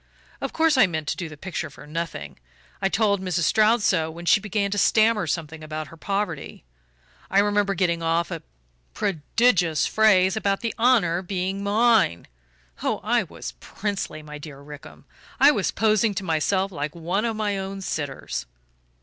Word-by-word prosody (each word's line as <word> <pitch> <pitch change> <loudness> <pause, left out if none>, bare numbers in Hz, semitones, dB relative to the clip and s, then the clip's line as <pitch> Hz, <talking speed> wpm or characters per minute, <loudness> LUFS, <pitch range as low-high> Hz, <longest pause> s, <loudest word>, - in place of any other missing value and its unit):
Of - - -3
course 320 -3 +2
I 215 - +7
meant 155 -3 -4
to - - -1
do 175 -3 -5
the 155 - -11
picture 185 +4 -4
for - - -13
nothing 150 - -5 0.4
I 195 - +2
told 200 -2 +1
Mrs. 180 -3 -1
Stroud 220 +5 +3
so 160 -5 +2
when 170 +2 -9
she 200 - +5
began 200 -1 -1
to 205 - 0
stammer 220 0 +3
something 160 -1 -4
about 155 0 -5
her - - -12
poverty. 195 - -3 0.7
I 195 - 0
remember 205 -1 +2
getting 170 -2 +1
off 165 0 0
a - - -4 0.5
prodigious 175 -1 +1
phrase 190 -4 +4
about 200 -2 0
the 230 - -2
honour 215 -8 +3
being 190 +1 -3
MINE 210 - +3 0.6
oh, - - -1
I - - +2
was - - -7
princely, 200 -6 -4
my 150 0 -9
dear 145 -2 -10
Rickham! 145 0 -12 0.4
I 285 +2 +8
was 205 -10 0
posing 215 -1 +2
to 190 - -3
myself 185 +4 0
like 150 -2 -4
one 175 +5 -1
of 230 -1 -1
my 205 -2 -1
own 195 0 -5
sitters. 145 - -4
190 Hz, 170 wpm, -24 LUFS, 160-210 Hz, 0.7 s, I